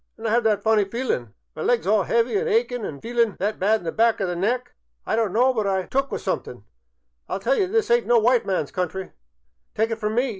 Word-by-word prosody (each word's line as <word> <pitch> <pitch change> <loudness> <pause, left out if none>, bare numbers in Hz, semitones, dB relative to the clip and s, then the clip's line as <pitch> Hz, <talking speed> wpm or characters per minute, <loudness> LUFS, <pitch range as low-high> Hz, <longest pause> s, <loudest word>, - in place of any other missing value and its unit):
An' 225 - -9
I 220 - 0
'ave 235 -2 +3
that 210 - 0
funny 220 -2 +3
feelin's, 195 - -3 0.3
my - - -6
legs 240 -1 +1
all 205 0 +3
'eavy 235 - +1
an' 435 +4 0
achin' 440 - 0
an' 140 -2 -7
feelin' 235 -2 0
that 210 +3 -2
bad 215 +3 +2
in - - -13
the 165 - -2
back 230 +3 +2
o' 195 - 0
the 180 -1 -2
neck 245 +7 -1 0.3
I - - 0
don't 225 -3 0
know 255 +5 +3
but 215 -4 -1
I 190 -1 0
'm - - -17
took 275 +1 0
with - - -4
somethink. - - -4 0.7
I - - -3
'11 - - -4
tell - - +2
ye 410 -5 +2
this 445 +3 0
ayn't 235 -3 +3
no 240 0 +5
white 240 +2 +3
man's 180 -7 -1
country, 185 +1 -4 0.6
tyke 220 +1 +1
it 225 - -3
from 215 0 -2
me. 250 +2 +1
225 Hz, 260 wpm, -23 LUFS, 200-245 Hz, 0.7 s, no